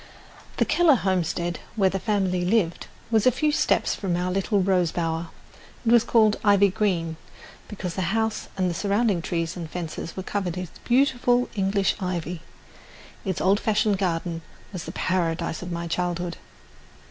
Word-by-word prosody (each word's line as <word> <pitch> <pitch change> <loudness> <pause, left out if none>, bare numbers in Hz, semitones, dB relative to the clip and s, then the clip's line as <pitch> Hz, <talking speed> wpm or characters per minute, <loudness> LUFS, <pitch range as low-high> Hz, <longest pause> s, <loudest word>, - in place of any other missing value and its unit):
The - - +3
Keller 340 -5 +5
homestead, 175 -4 -1 0.2
where 195 -4 +3
the 195 - -2
family 190 -3 0
lived, 180 -3 +1 0.2
was 220 +1 +3
a - - +7
few 305 +5 +1
steps - - +2
from 185 -4 -2
our 180 +1 -1
little 195 +2 +1
rose 180 -3 +2
bower. 165 -1 -2 0.6
It 225 - +3
was 235 -1 +6
called 220 -3 +4
"Ivy 200 -1 +5
Green" 170 -6 0 0.5
because 190 -4 -5
the 180 -2 -1
house 220 -1 -1
and 185 -1 +1
the 175 - -1
surrounding 200 0 +1
trees 165 0 -2
and 170 -3 -6
fences 165 0 -6
were 190 - -3
covered 185 -3 -2
with 180 -2 -7
beautiful 250 -1 +3
English 195 -2 +1
ivy. 180 -3 -3 0.8
Its 190 -4 -2
old 195 +2 +3
fashioned 215 -2 +1
garden 170 -2 -1 0.3
was 180 -4 -5
the 165 - -5
paradise 170 -2 -1
of 180 0 -6
my 170 0 -3
childhood. 175 0 -2
185 Hz, 160 wpm, -25 LUFS, 175-210 Hz, 0.8 s, a